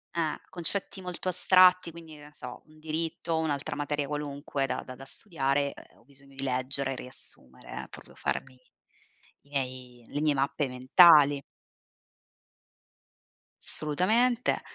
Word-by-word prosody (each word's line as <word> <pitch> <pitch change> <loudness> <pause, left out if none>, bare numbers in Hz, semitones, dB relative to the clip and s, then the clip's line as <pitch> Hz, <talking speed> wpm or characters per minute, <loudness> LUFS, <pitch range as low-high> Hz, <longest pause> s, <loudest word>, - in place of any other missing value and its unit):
eh, 160 -3 -1
concetti 185 +2 -3
molto 180 0 -4
astratti 185 -1 +4
quindi 165 -1 -12
che 150 - -14
ne 150 0 -15
so, 125 -3 -9
un 155 0 -20
diritto, 160 +1 -3
un'altra 150 -3 -2
materia 145 -1 -2
qualunque 145 -1 -3
da 130 -1 -3
da 130 - -10
da 135 +1 -12
studiare, 140 -1 -2
ehm, - - -17
ho - - -24
bisogno 140 0 -19
di 135 - -6
leggere 135 +1 -1
e - - -6
riassumere 65 - -11
eh, - - -11
proprio - - -13
farmi 130 -1 -4 0.8
i 140 - -27
miei 130 -3 -5
le 145 - -4
mie 150 -1 +2
mappe 140 +1 -1
mentali. 145 +3 +6 2.2
Assolutamente, 225 +11 +3
145 Hz, 140 wpm, -28 LUFS, 135-165 Hz, 2.2 s, mentali